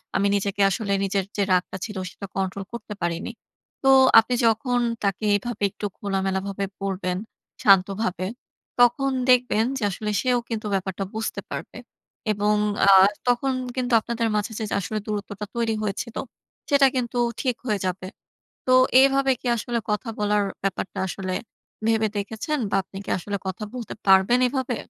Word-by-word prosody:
আমি 200 0 +3
নিজেকে 200 0 -1
আসলে, 200 +1 -2
নিজের 195 -1 0
যে 200 - +2
রাগটা 185 +1 +1
ছিল, 210 -3 -7
সেটা 200 - -9
কন্ট্রোল 195 0 -2
করতে 215 -2 -6
পারিনি।" 170 +5 -2 0.5
তো 270 - +4 0.3
আপনি 235 +3 0
যখন 245 +2 +1 0.2
তাকে 200 +2 -1
এভাবে 240 0 -5
একটু 210 - -6
খোলামেলাভাবে 195 0 -2 0.2
বলবেন, 185 -2 -2 0.5
শান্তভাবে, 195 -1 +3 0.5
তখন 270 +3 +4 0.2
দেখবেন 250 -3 +4
যে 225 - -4
আসলে 210 +3 -4
সেও 250 -1 +2
কিন্তু 220 -2 -3
ব্যাপারটা 190 0 -2
বুঝতে 220 +1 -3
পারবে। - - -6 0.5
এবং 210 +1 +1 0.3
আ - - +8 0.4
তখন 250 +2 +2 0.2
কিন্তু 250 -1 -1
আপনাদের 230 +1 -2
মাঝে 210 +2 -1
যে, - - -2 0.2
আসলে 215 +3 -3
দূরত্বটা 205 -1 -4
তৈরি 230 -2 0
হয়েছিল 215 +3 -4 0.5
সেটা 280 -1 +6
কিন্তু, 245 -1 -2 0.2
ঠিক 255 -3 0
হয়ে 210 -4 0
যাবে। 185 0 -3 0.6
তো 255 - +3 0.3
এভাবে 275 0 +3
কি - - -9
আসলে 235 +2 -2
কথা 210 +3 -1
বলার 210 0 +2 0.2
ব্যাপারটা 195 -1 -3
আসলে 185 0 -4 0.5
ভেবে 220 -1 +2
দেখেছেন 220 +9 -2
বা - - +2
আপনি 195 - -10
কি - - -6
আসলে 200 +3 -4
কথা 190 +3 -4
বলতে 235 -4 -6
পারবেন 190 +6 +5
এভাবে? 260 -2 -2
210 Hz, 150 wpm, -24 LUFS, 195-240 Hz, 0.6 s, আ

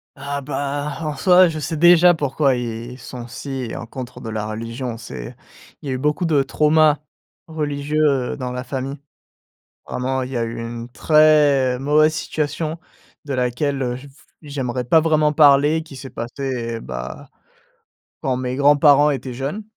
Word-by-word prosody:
Ah, 140 +1 -4
bah, 145 +1 -3
en 155 -2 -3
soi 185 +1 +5
je 160 -2 -4
sais 155 +2 -3
déjà 175 +2 +7
pourquoi 140 -2 +1
ils 120 +1 -5
sont 125 -2 -9
si, 125 0 -6
en - - -6
contre 125 +1 -8
de 115 - -7
la 105 -1 -3
religion. 115 +2 -5
C'est, 65 - -8 0.5
il 145 - -8
y - - -1
a - - 0
eu - - -2
beaucoup 150 +5 0
de 155 -4 +3
traumas 150 +1 +3 0.5
religieux, 150 -1 -2 0.3
heu, - - -7
dans 125 -2 -4
la 125 0 -4
famille. 135 +1 -4 0.9
Vraiment 130 +1 -2
il 130 - -5
y 130 - -4
a 115 - 0
eu 115 0 -5
une 115 0 -6
très 145 -2 +4
mauvaise 155 +2 +3
situation 155 +1 -3 0.5
de 140 - -4
laquelle, 130 +3 -1
heu, 125 -1 -2
je 130 +3 -11
v 135 - -16 0.3
j'aimerais 130 -4 -3
pas 160 +7 +5
vraiment 155 -1 +2
parler, 150 +1 +5
qui 150 -4 -12
s'est 130 0 -9
passée, 120 -1 -4
bah, 65 0 -7 0.9
quand 130 -1 0
mes 130 0 -3
grands-parents 145 +1 +5
étaient 130 -1 -4
jeunes 140 - -4
140 Hz, 170 wpm, -20 LUFS, 125-150 Hz, 0.9 s, déjà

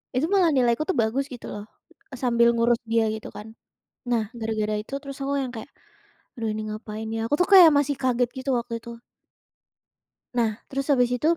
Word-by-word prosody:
itu 260 +5 +2
malah 380 -3 +4
nilai 245 -3 +3
aku - - +1
tuh - - +1
bagus 250 +5 -1
gitu 250 -4 -10
loh, 205 0 -7 0.5
sambil 235 -2 +3
ngurus 235 0 +2
dia 225 -1 +3
gitu 220 - -8
kan. 210 - -8 0.6
Nah, 230 -2 +2
gara-gara 215 -1 -2
itu 220 - -19
terus 275 -2 -8
aku 275 +1 -1
yang 255 -2 -5
kayak, 225 +4 -8 0.7
"Aduh 225 -2 -3
ini 215 0 -4
ngapain 215 0 -6
ya?" 225 - -2
Aku 290 - +1
tuh 360 - +3
kayak 365 -4 +10
masih 285 0 0
kaget 250 -1 +1
gitu 260 +1 -3
waktu 235 0 -5
itu. 235 0 -9 1.3
Nah 235 -2 +2 0.2
terus 275 +1 -4
habis 250 -3 +3
itu, 310 +7 +2
240 Hz, 190 wpm, -25 LUFS, 225-275 Hz, 1.3 s, kayak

